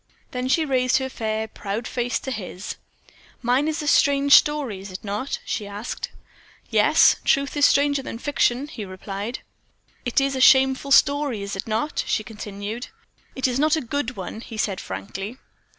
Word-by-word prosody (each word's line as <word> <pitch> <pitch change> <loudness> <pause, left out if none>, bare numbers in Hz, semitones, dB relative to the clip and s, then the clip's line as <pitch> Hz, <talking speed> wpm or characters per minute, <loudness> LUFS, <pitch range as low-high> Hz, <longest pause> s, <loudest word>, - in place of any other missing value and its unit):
Then 250 0 -3
she 310 +5 +2
raised 255 -2 +2
her 265 0 -2
fair, 220 -2 -2
proud 215 +2 -5
face 245 -1 -1
to 265 - -5
his. 200 -3 -6 0.7
"Mine 250 +5 +2
is 315 0 -2
a - - -4
strange 280 -1 +4
story, 290 -9 +4
is 195 0 -9
it 185 - -8
not?" 210 +6 -3
she 210 -4 -3
asked. 205 +3 -5 0.6
"Yes - - +5
truth 280 +1 +1
is 290 -1 +6
stranger 285 0 +2
than 230 - -6
fiction," 270 0 +1
he 235 -7 -7
replied. 200 +4 -6
"And - - -44 0.6
it 245 - +2
is 275 0 0
a 260 - -1
shameful 265 +1 +5
story, 280 -6 +3
is 200 0 -4
it 195 - -5
not?" 225 +8 -1
she 215 - 0
continued. 210 +1 -6 0.5
"It 265 - +1
is 250 +1 -1
not 310 +1 +3
a 315 - -1
good 255 0 -3
one," 195 +4 -6
he 225 -2 -9
said, 200 -2 -1
frankly. 195 - -6
245 Hz, 180 wpm, -23 LUFS, 210-275 Hz, 0.7 s, is